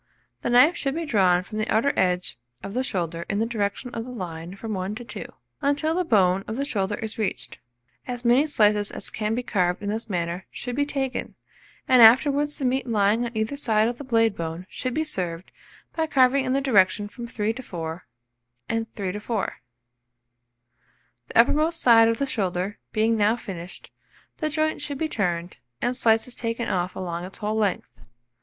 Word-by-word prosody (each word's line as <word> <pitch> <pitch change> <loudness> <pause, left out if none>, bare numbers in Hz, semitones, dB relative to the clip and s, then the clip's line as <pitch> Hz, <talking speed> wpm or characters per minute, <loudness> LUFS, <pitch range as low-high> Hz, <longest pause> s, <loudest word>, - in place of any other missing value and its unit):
The - - -2
knife 255 +8 +6
should 275 0 -2
be 335 0 -2
drawn 185 - +3
from 215 +3 -6
the 215 - -1
outer 230 +6 +3
edge 180 -8 0 0.2
of 195 - -6
the 255 +3 0
shoulder 170 -7 -3
in 200 - 0
the 220 - +1
direction 225 +1 -2
of 225 - -3
the 250 - -9
line 175 -6 -6
from 220 +2 -5
1 190 +2 -3
to 240 - -7
2, 215 - -7 0.3
until 290 +3 +1
the 365 +2 +1
bone 195 - +3
of 220 - -4
the 280 - -1
shoulder 205 -7 -1
is 220 +1 -5
reached. 210 -4 -3 0.5
As 245 -1 -5
many 250 +6 +4
slices 210 -7 +3
as - - -5
can 215 0 -1
be 250 - -2
carved 180 -4 0
in 205 - -2
this 220 +2 -3
manner 175 0 -3
should 245 -1 -5
be 285 +1 +1
taken, 270 -3 -3 0.5
and 255 -2 +6
afterwards 280 +6 +6
the 275 - -3
meat 255 0 0
lying 215 +1 +2
on 235 -1 -5
either 220 +5 -1
side 220 -6 +2
of 240 0 -4
the - - -6
blade 225 -5 +2
bone 165 +1 -5
should 255 -1 -3
be 315 - +1
served, 180 - -4 0.4
by 320 -1 0
carving 265 -1 +4
in 255 - 0
the 275 - +2
direction 205 -5 +3
of 235 0 -5
3 215 -1 -1
to 255 - -7
4 165 - -6 0.6
and 225 0 -2
3 195 -3 -3
to 205 - -5
4. 215 -1 -3 1.7
The - - -3
uppermost 310 +8 +4
side 230 -4 +6
of 230 0 +1
the 280 - 0
shoulder 195 -5 -2
being 225 +1 +2
now 215 +1 +3
finished, 180 -6 -9 0.5
the 310 - -1
joint 310 +1 -1
should 285 -2 -3
be 320 - -1
turned, 175 - -2 0.2
and 245 +1 -1
slices 230 0 +2
taken 230 0 -3
off 180 0 -1
along 175 -2 -4
its 185 +1 -8
whole 210 +1 -2
length. 205 -4 0
225 Hz, 195 wpm, -25 LUFS, 195-255 Hz, 1.7 s, knife